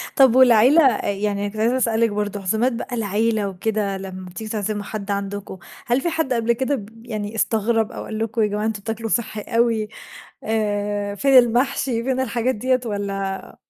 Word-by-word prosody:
طب 265 -4 +6
والعيلة 255 +4 +6
أ 245 -5 +2
يعني 200 0 -2
أنا 205 - -1
كنت 210 - -11
عايزة 235 +3 +2
اسألِك 230 -2 +2
برضه 205 -1 -3
عزومات 220 +7 +1
بقى 245 +2 -5
العيلة 215 0 0
وكده 200 +1 -2
لما 190 -1 -8
بتيجوا 215 +4 -7
تعزموا 210 -1 -2
حد 205 -1 -5
عندكم 200 -1 -4 0.3
هل 245 +2 +2
في 340 - 0
حد 320 -5 -1
قبل 235 0 +1
كده 265 +4 0
ب 210 -7 -7
ب 225 +2 -17
يعني 215 -2 -5
استغرب 225 0 +1
أو - - -6
قال 215 - -5
لكم 225 +1 -1
يا 215 - +3
جماعة 210 +1 -2
أنتم 220 -2 -2
تاكلوا 225 +1 -4
صحّي 220 -2 -1
أوي 230 0 +1 0.6
آآ 205 -2 -1
فين 270 +5 +5
المحشي 245 0 +2
فين 260 0 0
الحاجات 250 0 0
دِيّة 255 +4 +1
والّا 195 -2 -4
220 Hz, 190 wpm, -22 LUFS, 205-240 Hz, 0.6 s, طب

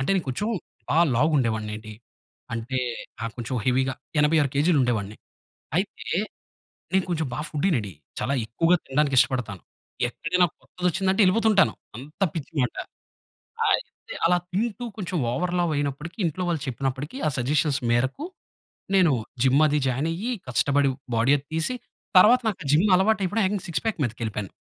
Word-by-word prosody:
అంటే 135 - 0
నేను 185 - 0
కొంచెం 165 +11 -2 0.4
బా 155 - +2 0.2
లావుగుండె 140 -2 +3
వాడినెండి. 110 0 -6 0.6
అంటే 120 +3 -2 0.4
ఆ - - -2
కొంచెం 120 +1 -4
హెవీగా 130 +1 +1 0.2
86 150 -1 +3
కేజీ‌లు 150 +3 +3
ఉండేవాడిని. 110 -4 -1 0.6
అయితే - - -2 0.8
నేను 190 -1 +3
కొంచెం 160 -3 0
బా - - -3
ఫుడ్డి‌నండి. 145 - 0 0.3
చాలా 140 - 0
ఎక్కువగా 165 +10 +3
తినడానికి 140 0 +1
ఇష్టపడతాను. 125 -8 +1 0.5
ఎక్కడైనా 175 +7 +1
కొత్తదొచ్చిందంటే 180 - -1
ఎళ్ళిపోతుంటాను. 205 +1 +4 0.2
అంత 145 +9 -12
పిచ్చి 160 -3 -5
మాట. 125 -2 0 0.9
ఆ - - +2
ఇది - - -13
అలా 180 +1 +4
తింటూ 215 +4 -1
కొంచెం 185 -3 -3
ఓవర్ 175 +8 -1
లావ్ 175 -2 +1
అయినప్పటికీ 145 +4 -3
ఇంట్లో 170 +3 -2
వాళ్ళు 165 -4 -1
చెప్పినప్పటికీ 135 - -3
ఆ - - +3
సజెషన్స్ 145 +3 +1
మేరకు 130 - 0 0.7
నేను 180 -5 +5 0.3
జిమ్ 135 +3 +4
అది 150 0 +2
జాయిన్ 130 +5 0
అయ్యి 205 +9 -3 0.2
కష్టపడి 140 +2 +2 0.2
బాడీ 115 +4 +3
అది 140 - -15
తీసి 160 +10 0 0.4
తర్వాత 235 +7 +7
నాకు 195 -4 -3
జిమ్ 165 +7 +4
అలవాటు 210 +3 +2
అయిపోడం 210 +5 0
ఏకంగ 200 -1 -2
సిక్స్ 170 - -1
పాక్ 220 -4 -1
మీదకెళ్ళిపోయాను. 110 -4 -4
150 Hz, 145 wpm, -25 LUFS, 130-180 Hz, 0.9 s, తర్వాత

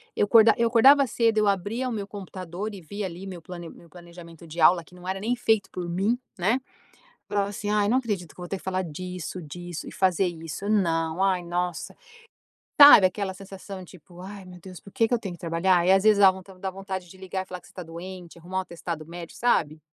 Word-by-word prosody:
eu - - +2
acordava 225 +1 +6
eu 235 0 +3
acordava 270 +5 +6
cedo 225 -2 +1
eu 210 - +2
abria 205 +6 -1
o - - -4
meu 205 -3 -4
computador 190 0 -7
e 195 - -8
vi 200 +5 -6
ali 185 +1 -6
meu 180 -3 -8
plane 175 0 -9
meu 170 - -16
planejamento 170 -1 -13
de 165 +2 -5
aula 170 +2 +6
que 180 +2 -18
não 180 - -13
era 190 +1 -3
nem 230 +5 -1
feito 220 -4 +1
por 175 -2 -5
mim, 200 +8 0 0.2
né. 225 +9 +1 0.7
Falava 200 -1 0
assim: 205 0 -5
"Ai 210 -1 +2
não 250 +4 +3
acredito 205 -10 -3
que - - -15
eu - - -7
vou - - -8
ter 195 - -3
que - - -18
falar 185 0 -1
disso, 180 +2 -6
disso 175 +2 -7
e - - -9
fazer 190 0 +2
isso, 165 +4 -6
não, 165 -5 +1
ai 190 -2 +2
nossa", 175 0 -3 0.9
sabe 285 -9 +10
aquela 190 0 -4
sensação 195 0 -9
tipo, 175 0 -16
ai 195 +1 -9
meu 180 -1 -12
Deus 185 0 -11
por 200 - -14
que 225 - +2
que 245 - -2
eu 240 - +2
tenho 195 -5 -6
que 175 - -13
trabalhar? 170 +1 +2
E - - +6
às 195 0 +4
vezes 215 -1 +5 0.4
dá 190 - -2
vontade 190 -2 -6
de 190 - -14
ligar 190 0 -4
e - - -19
falar 180 -1 -8
que - - -19
você - - -19
está 185 - -8
doente, 175 +1 -9
arrumar 180 +3 -6
um 190 - +2
atestado 170 -3 -6
médico, 170 0 -9
sabe? 155 -10 +1
185 Hz, 235 wpm, -25 LUFS, 175-205 Hz, 0.9 s, sabe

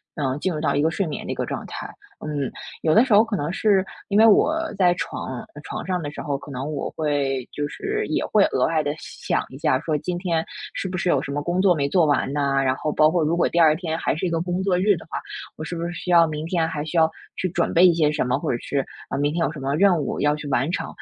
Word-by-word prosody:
嗯， 140 -2 -1
进 185 0 -1
入 155 - -3
到 - - +1
一 145 - +1
个 160 - +3
睡 185 +3 -1
眠 155 - -5
的 - - -3
一 - - -8
个 - - -2
状 - - -5
态。 - - -7 0.4
嗯， 145 -3 -2 0.3
有 155 -1 +2
的 225 - +7
时 235 - +1
候 210 +2 +7
可 225 -2 -3
能 150 -1 -2
是 195 -1 +2 0.2
因 200 - +1
为 220 - +7
我 285 +9 +5 0.2
在 180 -2 +4
床 130 -6 -5 0.2
床 - - -6
上 180 -2 -1
的 145 - -4
时 - - -7
候 140 -2 -2
可 145 - -12
能 140 +3 -4
我 140 - -3
会 140 -4 -1
就 145 0 -3
是 420 - -3
也 - - -1
会 210 -2 +4
额 - - +1
外 160 -1 +1
地 145 - -2
想 - - -3
一 - - -10
下 130 - +2
说 155 -2 -1
今 175 +3 -3
天 170 -3 0 0.3
是 195 - -3
不 185 0 -4
是 180 - -2
有 140 -6 +3
什 - - -7
么 145 +1 -2
工 175 +2 0
作 185 -3 +4
没 140 -2 0
做 170 +2 +3
完 145 -2 +1
呐， 140 -2 +1
然 130 -1 +2
后 155 - -2
包 155 +1 +4
括 175 -1 +1
如 160 +3 +1
果 - - +3
第 170 - 0
二 155 -2 +6
天 165 -1 -3
还 - - 0
是 175 - -2
一 - - 0
个 165 -1 0
工 180 +1 -2
作 185 -2 +2
日 200 0 +4
的 - - -11
话， - - -3 0.4
我 155 - -6
是 170 +2 -5
不 170 0 -3
是 175 - -3
需 180 - -7
要 170 -1 +7
明 155 0 -4
天 165 -2 +1
还 150 -2 -3
需 165 +2 -3
要 160 0 +4 0.2
去 185 - -1
准 170 0 -1
备 175 +2 +6
一 175 - +6
些 155 -2 +2
什 150 -4 -1
么， 125 +2 0
或 - - -1
者 120 - 0
是， 140 -2 -1 0.3
呃， - - -2
明 145 +1 +1
天 170 0 +1
有 145 - -2
什 155 - -8
么 135 +2 -1
任 190 0 +4
务 140 - -3
要 145 0 +3
去 150 -1 -7
完 135 +4 0
成。 - - -2
160 Hz, 315 characters per minute, -23 LUFS, 145-180 Hz, 0.4 s, 的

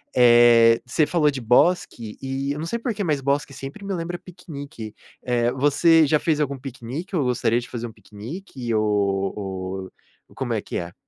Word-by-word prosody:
eh, 120 -1 +6
você 135 +5 +2
falou 160 -4 +2
de 135 -2 -6
bosque, 120 -2 +1
e 135 +1 -3
eu 145 - -6
não 160 - -3
sei 235 - -2
por 235 0 -2
que, 205 -1 -3
mas 150 -5 0
bosque 140 +1 -1
sempre 135 +9 -8
me 195 - -3
lembra 175 0 -4
piquenique, 145 - -9 0.3
eh, 120 -1 +1
você 145 +5 +4
já 150 +1 +3
fez 155 -1 0
algum 140 -2 -1
piquenique 135 - -6
ou 155 - +2
gostaria 120 -2 +1
de 120 - -9
fazer 120 -1 -5
um 115 - -12
piquenique, 120 - -7
ou 95 -2 -1 0.4
ou - - -20
como - - -3
é - - -1
que - - -5
é? 85 0 -5
130 Hz, 190 wpm, -23 LUFS, 115-155 Hz, 0.4 s, eh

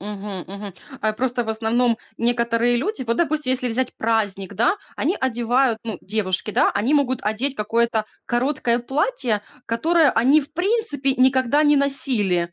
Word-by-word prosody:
Мгм, 200 -2 -6
мгм. 200 -1 -8 0.3
А 215 0 0
просто, 245 +2 -1
в - - -9
основном, 225 +2 +1 0.2
некоторые 235 0 +1
люди 300 - -2
вот, 230 - 0
допустим, 305 -4 0
если 250 -1 0
взять 250 +2 -2
праздник, 205 -3 -1
да, 235 - +2 0.2
они 335 +7 0
одевают, 240 -1 +1
ну, 225 -3 -5
девушки, 195 -1 -1
да, - - +3
они 235 +8 +1
могут 260 -3 +1
одеть 230 +6 -1
какое-то 230 0 0 0.2
короткое 245 -1 0
платье, 265 - -1 0.3
которое 310 +5 +3
они 265 +7 +4
в 290 +1 -11
принципе 350 - +1
никогда 260 +2 +3
не 295 -1 +4
носили, 215 -11 0
240 Hz, 155 wpm, -22 LUFS, 220-275 Hz, 0.3 s, они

